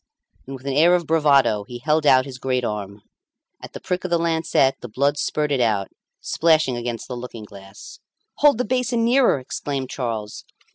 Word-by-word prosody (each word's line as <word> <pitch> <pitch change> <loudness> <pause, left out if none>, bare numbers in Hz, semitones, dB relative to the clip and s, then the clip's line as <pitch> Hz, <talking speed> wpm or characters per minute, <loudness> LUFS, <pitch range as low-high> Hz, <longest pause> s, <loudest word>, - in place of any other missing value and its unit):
And 135 - -6
with 130 0 -13
an 140 - -2
air 165 +5 +5
of 175 -1 -1
bravado 140 -9 +3
he 120 +4 -9
held 150 +4 0
out 130 -1 +5
his 130 -2 -9
great 125 -1 -1
arm. 100 -2 -5 0.6
At - - -11
the - - -7
prick 180 0 -3
of 185 - -4
the 170 - +2
lancet 160 -5 +1
the - - -7
blood 140 +6 0
spurted 150 -4 -1
out, 105 -4 0 0.3
splashing 155 -5 +1
against 120 -1 -5
the 125 - -6
looking 120 -3 -8
glass. 100 0 -13 0.4
"Hold 290 -4 +4
the 250 - -1
basin 240 -1 0
nearer," 250 - +3
exclaimed 135 0 -5
Charles. 115 -5 -5
135 Hz, 185 wpm, -22 LUFS, 120-160 Hz, 0.6 s, air